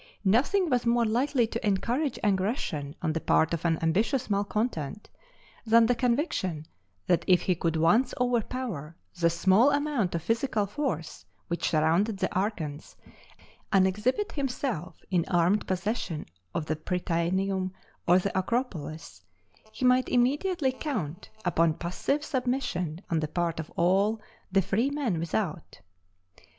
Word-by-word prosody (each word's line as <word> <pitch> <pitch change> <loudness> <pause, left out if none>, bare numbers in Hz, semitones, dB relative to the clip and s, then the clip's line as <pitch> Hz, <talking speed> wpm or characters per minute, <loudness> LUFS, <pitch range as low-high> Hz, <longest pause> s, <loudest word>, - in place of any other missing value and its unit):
Nothing 285 - +3
was 250 -5 +1
more 235 0 +3
likely 245 +3 +2
to 230 +1 -5
encourage 235 +7 0
aggression 190 - -1
on 160 -2 +1
the 165 - -2
part 160 +1 +2
of 165 - -2
an 165 -1 +2
ambitious 215 +9 +1
malcontent, 205 - -2 0.5
than 230 0 +5
the 245 - +3
conviction 235 - -1 0.4
that 175 -2 +2
if 180 -2 +5
he 185 - +2
could 165 -1 -1
once 170 +11 +3
overpower 235 - -2 0.2
the 170 -1 +4
small 190 +9 +4
amount 285 - 0
of 165 - -2
physical 225 +1 0
force 195 - -3 0.3
which 170 - -1
surrounded 170 +7 +2
the 190 -1 -1
archons, 170 -7 -3 0.8
and 195 -2 +5
exhibit 240 - 0
himself 250 - -3 0.2
in 175 -3 +3
armed 180 +3 +2
possession 185 -4 -2 0.3
of 155 - -1
the 155 - -1
Prytaneum 185 +3 -1 0.4
or 175 +1 +6
the 190 +1 -1
Acropolis, 180 - -3 0.5
he 255 - -3
might 250 0 +4
immediately 275 +4 +2
count 215 - -4 0.2
upon 165 -2 +2
passive 275 - -2
submission 245 - -2
on 165 - +2
the 155 - -1
part 165 +1 -2
of 160 - -6
all 195 +5 +2 0.3
the 195 0 +3
freemen 230 - 0
without. 170 -1 -3
195 Hz, 135 wpm, -28 LUFS, 170-245 Hz, 0.8 s, or